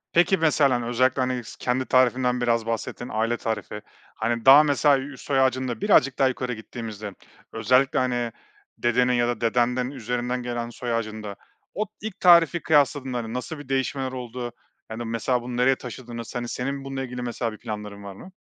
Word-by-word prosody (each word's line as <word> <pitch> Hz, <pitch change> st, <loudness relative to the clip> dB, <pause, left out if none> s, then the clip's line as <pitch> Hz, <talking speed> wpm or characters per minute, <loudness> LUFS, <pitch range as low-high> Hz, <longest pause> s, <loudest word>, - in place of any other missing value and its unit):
Peki 175 Hz, +3 st, +4 dB
mesela, 150 Hz, -4 st, +3 dB
hani, 120 Hz, -1 st, -2 dB
özellikle, 130 Hz, +2 st, +2 dB
hani, 125 Hz, -1 st, -2 dB
s -, -, -11 dB
kendi 125 Hz, +1 st, 0 dB
tarifinden 125 Hz, 0 st, +2 dB
biraz 115 Hz, -2 st, +1 dB
bahsettin. 115 Hz, +1 st, -4 dB
Aile 115 Hz, +2 st, 0 dB
tarifi. 105 Hz, -2 st, -4 dB, 0.4 s
Hani, 115 Hz, +1 st, -1 dB
daha 140 Hz, +3 st, +9 dB
mesela 145 Hz, -1 st, +3 dB
üst 135 Hz, 0 st, -8 dB
soy 135 Hz, -2 st, +2 dB
ağacında 130 Hz, -3 st, 0 dB
birazcık 140 Hz, +1 st, +3 dB
daha 135 Hz, -, +4 dB
yukarı 125 Hz, -1 st, -3 dB
gittiğimizde, 110 Hz, -2 st, -7 dB, 0.4 s
özellikle, 125 Hz, +5 st, +2 dB
hani, 120 Hz, -2 st, 0 dB, 0.5 s
dedenin 125 Hz, +1 st, +2 dB
ya 120 Hz, -1 st, +2 dB
da 120 Hz, -2 st, -2 dB
dedenden 125 Hz, +2 st, +1 dB
üzerinden 125 Hz, -1 st, -3 dB
gelen 120 Hz, -1 st, -4 dB
soy 120 Hz, 0 st, -4 dB
ağacında, 110 Hz, -3 st, -4 dB, 0.4 s
o 215 Hz, -, -1 dB
ilk 210 Hz, -2 st, -7 dB
tarifi 170 Hz, -1 st, +6 dB
kıyasladığında 135 Hz, -6 st, +1 dB
nasıl 125 Hz, +5 st, -5 dB
bir 145 Hz, -2 st, -11 dB
değişmeler 135 Hz, 0 st, -1 dB
oldu? 125 Hz, -1 st, -6 dB, 0.4 s
Hani, 115 Hz, +2 st, -5 dB
mesela 115 Hz, +2 st, -1 dB
bunu 120 Hz, 0 st, -5 dB
nereye 130 Hz, +2 st, +3 dB
taşıdınız? 120 Hz, -2 st, -8 dB
Hani, 120 Hz, -1 st, -3 dB
senin 135 Hz, +3 st, -3 dB
bununla 135 Hz, -1 st, -4 dB
ilgili 125 Hz, -1 st, -6 dB
mesela, 120 Hz, -1 st, -3 dB
bir 110 Hz, -, -11 dB
planların 105 Hz, -2 st, -7 dB
var 100 Hz, -1 st, -8 dB
mı? 185 Hz, -, -13 dB
125 Hz, 175 wpm, -25 LUFS, 115-130 Hz, 0.5 s, daha